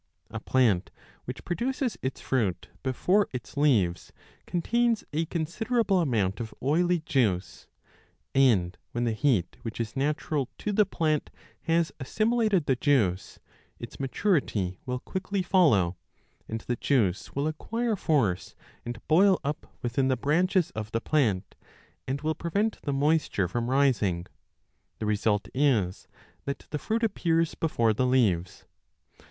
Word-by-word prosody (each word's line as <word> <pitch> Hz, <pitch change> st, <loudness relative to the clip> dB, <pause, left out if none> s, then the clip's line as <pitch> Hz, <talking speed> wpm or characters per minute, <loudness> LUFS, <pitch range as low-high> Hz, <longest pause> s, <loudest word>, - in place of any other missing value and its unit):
2 110 Hz, -, -4 dB
A -, -, -4 dB
plant 110 Hz, -7 st, +2 dB, 0.4 s
which -, -, -7 dB
produces 245 Hz, +4 st, -1 dB
its 130 Hz, +1 st, -3 dB
fruit 110 Hz, -9 st, -1 dB
before 180 Hz, +10 st, +2 dB
its 125 Hz, +2 st, -7 dB
leaves 110 Hz, -12 st, +2 dB, 0.4 s
contains 230 Hz, +6 st, +1 dB
12 155 Hz, -, 0 dB
a -, -, -1 dB
considerable 195 Hz, +6 st, 0 dB
amount 110 Hz, -, 0 dB
of 115 Hz, -2 st, -6 dB
oily 175 Hz, +5 st, +2 dB
juice, 110 Hz, -, -1 dB, 0.7 s
and 110 Hz, -10 st, +3 dB
when 120 Hz, -, -1 dB
the 120 Hz, -, +1 dB
heat 110 Hz, -, +1 dB
which 115 Hz, 0 st, -6 dB
is 110 Hz, -2 st, -3 dB
natural 145 Hz, -1 st, -1 dB
to 210 Hz, -, -3 dB
the 210 Hz, 0 st, +3 dB
plant 155 Hz, -2 st, 0 dB, 0.4 s
has 165 Hz, 0 st, +2 dB
assimilated 215 Hz, -, +1 dB
the 135 Hz, -, +2 dB
juice, 120 Hz, -, +1 dB, 0.4 s
its -, -, -9 dB
maturity 130 Hz, -, 0 dB
will 125 Hz, 0 st, -1 dB
quickly 190 Hz, +7 st, -3 dB
follow, 125 Hz, -, +3 dB, 0.5 s
and 110 Hz, 0 st, -4 dB
the 120 Hz, -, -3 dB
juice 110 Hz, -9 st, 0 dB
will 140 Hz, +1 st, 0 dB
acquire 225 Hz, +9 st, -1 dB
15 -, -, -11 dB
force 110 Hz, -, +1 dB, 0.3 s
and 120 Hz, 0 st, -7 dB
boil 185 Hz, +4 st, +5 dB
up 150 Hz, +3 st, -3 dB, 0.2 s
within 125 Hz, +2 st, +1 dB
the 130 Hz, -1 st, +1 dB
branches 175 Hz, +6 st, +2 dB
of 110 Hz, 0 st, -6 dB
the 115 Hz, -, +1 dB
plant 115 Hz, -9 st, 0 dB, 0.5 s
and 135 Hz, +2 st, -2 dB
will 155 Hz, +1 st, 0 dB
prevent 200 Hz, +7 st, -1 dB
the 145 Hz, -, -2 dB
moisture 140 Hz, -, +1 dB
from 120 Hz, +6 st, -2 dB
rising; 115 Hz, -11 st, +2 dB, 0.7 s
the -, -, -4 dB
result 105 Hz, 0 st, +1 dB
is 120 Hz, -10 st, +1 dB, 0.4 s
that 140 Hz, -, -4 dB
the 150 Hz, -, -2 dB
fruit 225 Hz, +7 st, -1 dB
appears 165 Hz, -6 st, +1 dB
before 115 Hz, -9 st, +1 dB
the 125 Hz, +4 st, +1 dB
leaves. 100 Hz, -8 st, +1 dB
135 Hz, 145 wpm, -27 LUFS, 110-170 Hz, 0.7 s, boil